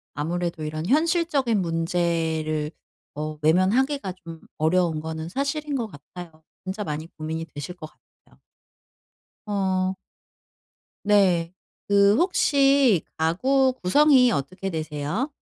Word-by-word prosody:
아무래도 170 +2 -3
이런 155 +1 -4
현실적인 295 - +2
문제를 165 -2 -1 0.4
어 155 0 -4
외면하기가 195 - +2
좀 165 -1 -10 0.2
어려운 160 0 +1
거는 160 +1 -5
사실인 280 - -2
것 235 -4 -2
같아요. 160 0 -12 0.2
진짜 195 +3 -4
많이 155 -1 -5
고민이 160 +1 -4
되실 150 +3 -8
것 155 -3 -9
같아요. - - -31 1.1
어. 190 -2 0 1.1
네. 185 -5 +3 0.3
그 200 +1 +4
혹시 275 - +3
가구 260 +12 +2
구성이 260 +4 +5
어떻게 185 +4 -3
되세요? 155 - -3
180 Hz, 235 characters per minute, -24 LUFS, 160-245 Hz, 1.1 s, 구성이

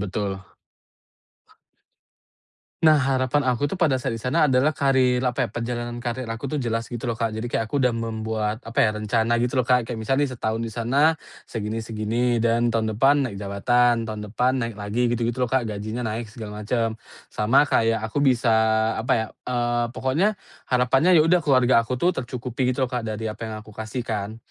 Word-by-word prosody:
betul. 100 -1 -3 2.4
Nah, 155 -2 +6
harapan 130 +1 +1
aku 130 +3 +1
tuh 195 - -4
pada 160 -7 +3
saat 130 - -1
di 115 - -4
sana 140 +7 +2
adalah 130 +4 +3
karir, 130 -3 +2
apa 125 0 0
ya, - - -12
perjalanan 120 +1 -4
karir 120 +1 -3
aku 115 +4 -5
tu - - 0
jelas 115 -2 -1
gitu 120 +1 -5
loh, 120 - -1
Kak. 115 -1 -1
Jadi 110 +2 -4
kayak 115 -2 -2
aku 145 - 0
dah 125 -2 +2
membuat 110 -1 -3
apa 115 - +1
ya, 110 - +4
rencana 110 +2 +1
gitu 125 +1 -1
loh, 130 - +2
Kak. 125 -2 +2
Kayak 120 - -4
misalnya 135 +5 +1
nih, - - -7
setahun 110 -1 -2
di 115 - -3
sana 130 +8 +2 0.3
segini-segini, 115 +2 -1
dan 115 +1 +2
tahun 110 -1 0
depan 135 +6 +3
naik 100 - -8
jabatan, 115 +4 +2
tahun 110 -1 -5
depan 125 +5 +1
naik 115 -1 -3
lagi, 105 +4 -1
gitu-gitu 120 0 -1
loh, 125 - +1
Kak, 130 0 +1
gajinya 110 +2 -4
naik 110 +1 -3
segala 105 -1 -8
macem. 115 +1 0 0.4
Sama 115 +7 +4
kayak 115 -5 +1
aku 110 +6 -3
bisa 125 -4 +3 0.5
apa 115 - 0
ya, 110 -1 -1 0.2
eee, 120 -1 0
pokoknya 140 +10 +1 0.4
harapannya 135 +8 +3
ya 155 - +7
udah 175 +2 +4
keluarga 130 -5 +4
aku 120 +2 -3
tuh 175 +8 +2
tercukupi 125 -3 -3
gitu 130 +1 +1
loh, 125 - -5
Kak, 125 - 0
dari 110 0 -4
apa - - -16
yang 110 - -5
aku 110 - -14
kasih 110 +3 -5
kan. 110 -2 -4
120 Hz, 195 wpm, -24 LUFS, 110-130 Hz, 2.4 s, ya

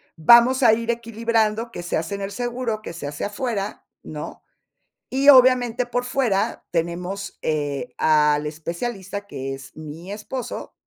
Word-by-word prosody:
vamos 235 - +6
a 220 - +7
ir 230 +1 0
equilibrando 230 -1 -1
que 175 - -7
se 175 - -1
hace 160 +5 -3
en 200 - -6
el 195 +1 -4
seguro, 240 -1 -3
que 170 - -7
se 155 -4 -6
hace 145 - -4
afuera, 210 -1 -3 0.2
¿no? - - -8 0.7
Y 270 +2 +1
obviamente, 250 -3 +6
por 245 0 -2
fuera 235 -5 0
tenemos, 180 +4 -3
eh, 145 - -2
al 150 -1 +3
especialista, 190 +6 -5
que 135 -6 -5
es 135 0 -12
mi 155 +4 -9
esposo 230 +4 -6
205 Hz, 150 wpm, -23 LUFS, 165-240 Hz, 0.7 s, a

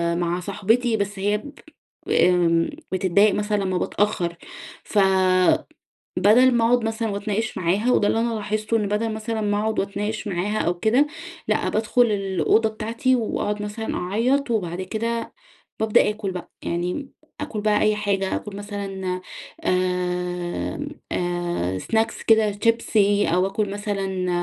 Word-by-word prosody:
مع 175 0 -1
صاحبتي، 220 +5 +1
بس 200 -1 -3
هي 205 +2 +1
ب 285 +7 -10 0.6
آمم، 170 -2 +3 0.2
بتتضايق 190 +2 +3
مثلًا 210 -1 0
لمّا 185 -1 0
بتأخر، 180 -3 0 0.5
فبدل 190 -2 +2 0.7
ما 235 -2 +3
أقعد 245 0 +3
مثلًا 225 0 -1
وأتناقش 210 +2 -2
معاها، 195 +7 +1
وده 205 - +3
اللي 225 - +1
أنا 230 0 0
لاحظته، 215 +1 -1
إن 210 -2 -1
بدل 215 +2 -1
مثلًا 220 +1 -3
ما 205 0 +1
أقعد 220 0 0
وأتناقش 210 +2 -3
معاها 200 +3 -1
أو 175 - +1
كده، 245 +9 +3 0.4
لأ، - - +1
بادخل 220 +3 +1
الأوضة 205 +1 +1
بتاعتي 230 +4 0
وأقعد 210 -2 -2
مثلًا 210 +2 -4
أعيط، 240 +9 0
وبعد 185 -5 -1
كده 230 +4 -3 0.5
بابدأ 220 -1 +4
آكل 210 -2 -3
بقى، 180 -1 -7
يعني 180 +11 -3 0.3
آكل 235 -8 -4
بقى 210 0 +2
أي 215 0 +3
حاجة، 200 -2 -1
آكل 210 -2 -6
مثلًا 195 -3 -4 0.4
آمم، 180 +6 -1 0.2
آآ، 175 - -1
snacks 225 - -1
كده 220 -2 +5
شيبسي، 210 -3 +3
أو 180 +3 +2
آكل 200 +1 -1
مثلًا 195 -3 -2
205 Hz, 140 wpm, -23 LUFS, 185-220 Hz, 0.7 s, كده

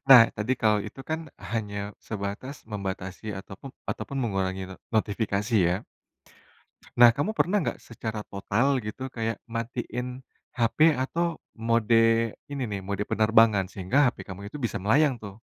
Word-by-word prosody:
Nah, 130 -3 +12
tadi, 105 +5 0
kalau 110 -1 +4
itu 110 - -9
kan 160 +1 0 0.3
hanya 105 -3 -2 0.3
sebatas, 105 +6 -4 0.2
membatasi 95 -1 -4
ataupum 100 +7 -10 0.2
ataupun 140 - -5
mengurangi 95 -4 -1
ne 95 - -8 0.2
notifikasi 105 0 0
ya. 90 - +2 1.2
Nah, 120 -1 +11
kamu 145 - 0
pernah 210 -2 +2
nggak, - - -3
secara 110 -2 -5
total 120 +8 +1
gitu, 130 +5 -5
kayak 115 -1 -3
matiin 125 +2 -4 0.3
HP 140 +7 +4
atau 165 +6 -1 0.2
mode 115 0 +3 0.5
ini 140 -1 -5
nih, 100 -1 -3
mode 100 +1 -2
penerbangan? 110 -3 +4
Sehingga 95 +6 -2
HP 125 - 0
kamu 100 +2 -7
itu 140 +8 -7
bisa 120 - -1
melayang 125 +7 +3
tuh. 100 -1 -10
115 Hz, 145 wpm, -27 LUFS, 100-130 Hz, 1.2 s, Nah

